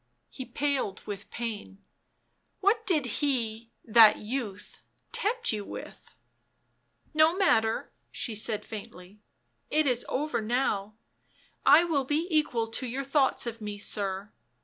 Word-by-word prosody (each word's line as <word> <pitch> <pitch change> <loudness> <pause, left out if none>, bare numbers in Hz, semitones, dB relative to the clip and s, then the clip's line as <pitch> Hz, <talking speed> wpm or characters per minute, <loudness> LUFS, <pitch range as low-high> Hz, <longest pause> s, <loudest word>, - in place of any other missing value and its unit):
He 260 - -7
paled 260 -5 -2
with 200 -1 -7
pain. 210 -4 -6 0.4
" - - -46
What 440 +3 +2
did 310 -8 +2 0.2
he 230 -5 -1
— - - -36
that 220 -2 +9
youth 210 -3 -6
— - - -43
tempt 470 - +1
you 210 -1 -3
with - - -10 0.4
?" - - -45
" - - -41
No 315 +2 +4
matter," 225 - +2 0.2
she 230 - -3
said 215 0 -2
faintly. 200 -2 -10 0.3
" 120 0 -46
It 310 +1 +2
is 250 -3 +1
over 295 -2 -1
now 215 -3 -1 0.4
— - - -35
I 335 - +5
will 300 -6 0
be 300 +5 0
equal 295 -7 +1
to 250 +3 -2
your 260 +3 -3
thoughts 275 -1 +2
of 230 -1 -5
me, 210 -1 -5
sir. 200 -1 -1
235 Hz, 155 wpm, -28 LUFS, 210-290 Hz, 0.4 s, that